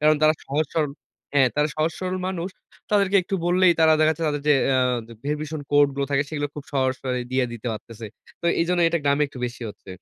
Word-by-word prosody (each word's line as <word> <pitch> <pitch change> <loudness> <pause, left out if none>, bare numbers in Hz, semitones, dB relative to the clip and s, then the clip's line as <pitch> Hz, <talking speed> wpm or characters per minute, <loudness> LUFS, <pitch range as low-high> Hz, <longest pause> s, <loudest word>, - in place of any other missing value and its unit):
কারণ 155 0 +4
তারা 155 +1 +5
সহজ 150 +3 0
সরল 150 -3 0 0.4
হ্যাঁ, 135 -3 +5
তারা 150 +1 +2
সহজ 155 +2 +1
সরল 185 0 -2
মানুষ। 185 -1 -3 0.4
তাদেরকে 200 -1 +3
একটু 195 +2 -4
বললেই 180 0 +5
তারা 160 0 +6
দেখাচ্ছে 155 +1 +2
তাদের 145 -1 -2
যে, 145 - +7
অ্যা 130 -1 +3 0.5
ভেরিফিকেশন 150 +1 -3
কোড 145 0 +6
গুলো 140 0 -1
থাকে 140 0 +2
সেগুলো 145 -1 -2
খুব 150 - -7
সহজ 130 -2 +1
করে 125 -1 -1
দিয়ে 130 0 +2
দিতে 120 +1 -8
পারতেছে। 110 0 -8 0.3
তো - - -13 0.2
এইজন্য 175 +1 +1
এটা 170 - 0
গ্রামে 140 +1 +3
একটু 130 - -11
বেশি 120 0 -8
হচ্ছে। 95 - -14
150 Hz, 210 wpm, -24 LUFS, 135-165 Hz, 0.5 s, যে